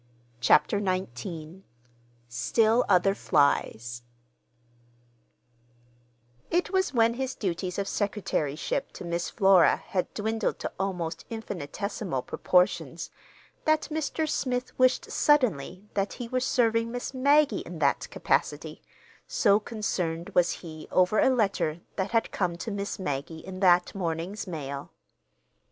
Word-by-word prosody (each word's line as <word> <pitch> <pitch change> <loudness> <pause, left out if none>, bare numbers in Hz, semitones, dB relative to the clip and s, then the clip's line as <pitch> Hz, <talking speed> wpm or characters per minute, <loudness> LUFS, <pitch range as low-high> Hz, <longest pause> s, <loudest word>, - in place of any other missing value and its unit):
CHAPTER 200 - +4
XIX 175 -1 -4 0.7
STILL 220 - +2
OTHER 185 +2 +4
FLIES 120 - +1 2.5
It 350 +2 +1
was 380 -1 +1
when 230 -2 +3
his 265 +1 -3
duties 180 -2 -3
of 200 -1 -1
secretaryship 195 -8 -2
to - - -8
Miss 170 0 -2
Flora 190 -5 +5
had 185 -2 -3
dwindled 220 +1 -1
to - - -4
almost 175 -4 -3
infinitesimal 200 - -4
proportions 170 -3 +1 0.5
that 310 0 +2
Mr. 315 0 -1
Smith 250 -3 -2
wished 255 0 +3
suddenly 205 - +2
that 200 0 -1
he 245 - -6
were 255 +2 0
serving 230 -2 +2
Miss 245 +2 -4
Maggie 285 +3 +4
in - - -8
that - - +1
capacity, - - -1 0.5
so 205 -2 +3
concerned 180 -7 -3
was 175 -1 +4
he 155 -1 -9
over 185 +4 +3
a - - +5
letter 195 -10 +1 0.2
that 190 0 -1
had 225 +1 +1
come 175 -3 -1
to 220 - -5
Miss 200 0 -3
Maggie 160 -2 -4
in 185 0 -7
that 180 -2 +4
morning's 180 +2 -3
mail. 140 -5 -6
195 Hz, 120 wpm, -27 LUFS, 165-230 Hz, 2.5 s, Flora